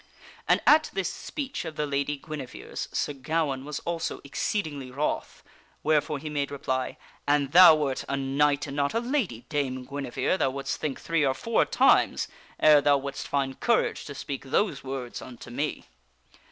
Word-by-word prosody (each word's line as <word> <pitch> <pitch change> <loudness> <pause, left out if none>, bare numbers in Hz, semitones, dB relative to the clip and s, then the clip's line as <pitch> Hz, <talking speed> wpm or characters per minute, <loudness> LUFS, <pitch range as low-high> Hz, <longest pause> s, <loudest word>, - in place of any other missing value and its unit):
And - - +4
at 310 +1 +6
this 195 -2 -1
speech 275 -3 -5
of 160 - -6
the 150 - -1
Lady 140 0 -1
Guinevere's, 145 -3 -7
Sir 145 - -1
Gawaine 140 -1 -1
was 150 0 -4
also 170 -1 -3
exceedingly 145 -2 -3
wroth, 140 +4 -3 0.4
wherefore 150 -1 +2
he 150 +3 -7
made 145 -2 -1
reply: 130 -2 -2
" - - -27
An 145 -1 +2
thou 175 +1 +9
wert 140 -4 -1
a 140 - 0
knight 140 +1 +1
and 140 -1 -6
not 140 +4 0
a - - +3
lady, 235 - -2
Dame 130 -3 -2
Guinevere, 140 +5 -1
thou 135 - +2
wouldst 135 +1 -3
think 145 -3 -2
three 165 -2 0
or 135 -1 +2
four 230 +8 +1
times - - +3 0.3
ere 150 -1 +7
thou 145 0 +4
wouldst 140 0 -5
find 135 -2 -1
courage 235 -2 +1
to 140 - -7
speak 140 0 -5
those 195 +10 0
words 130 -2 -5
unto 120 -2 -10
me." 145 +5 -3
145 Hz, 175 wpm, -27 LUFS, 135-155 Hz, 0.4 s, thou